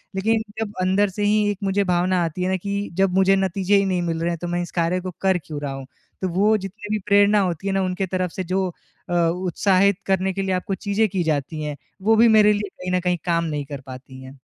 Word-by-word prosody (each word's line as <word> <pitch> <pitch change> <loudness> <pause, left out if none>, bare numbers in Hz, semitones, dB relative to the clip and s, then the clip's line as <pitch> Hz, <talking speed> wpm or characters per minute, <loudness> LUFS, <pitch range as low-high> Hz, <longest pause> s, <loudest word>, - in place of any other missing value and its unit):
लेकिन 220 +3 +1 0.2
जब 215 -2 -3
अंदर 190 +2 +2
से 205 +2 -4
ही 210 0 +3
एक 205 - -5
मुझे 195 +1 +1
भावना 180 0 +1
आती 170 +2 -3
है 185 - 0
ना 190 - +1
कि 200 0 -2
जब 190 0 +1
मुझे 195 0 +4
नतीजे 195 +1 +1
ही 195 - +2
नहीं 185 -2 0
मिल 165 -1 -2
रहे 170 - 0
हैं 170 - -2
तो 175 - -3
मैं 175 0 -1
इस 175 - -6
कार्य 170 +1 0
को 185 0 -5
कर 190 -1 +3
क्यों 150 -1 -6
रहा 140 -2 -3
हूँ। 135 0 -7 0.4
तो 185 - 0
वो 205 +5 +3
जितनी 205 +2 -8
भी - - -1
प्रेरणा 205 +1 +4
होती 180 0 -2
है 195 - 0
ना 195 - +1
उनके 185 +1 -1
तरफ 185 -1 -2
से 185 - -4
जो 185 +1 -1 0.4
अ, - - -2
उत्साहित 185 +3 +2
करने 190 0 +1
के 195 - -2
लिए 190 -1 -1
आपको 190 +2 -2
चीज़ें 205 +3 0
की 185 -2 -1
जाती 155 0 -2
हैं, 150 -1 -4 0.3
वो 220 +3 +4
भी 230 +2 +6
मेरे 210 -1 +6
लिए 205 0 -3
कहीं 180 0 -7
न - - +1
कहीं 180 0 0
काम 170 -1 +1
नहीं 150 -3 -3
कर 140 -1 -7
पाती 130 0 -10
हैं। 130 +1 -12
185 Hz, 260 wpm, -22 LUFS, 170-200 Hz, 0.4 s, भी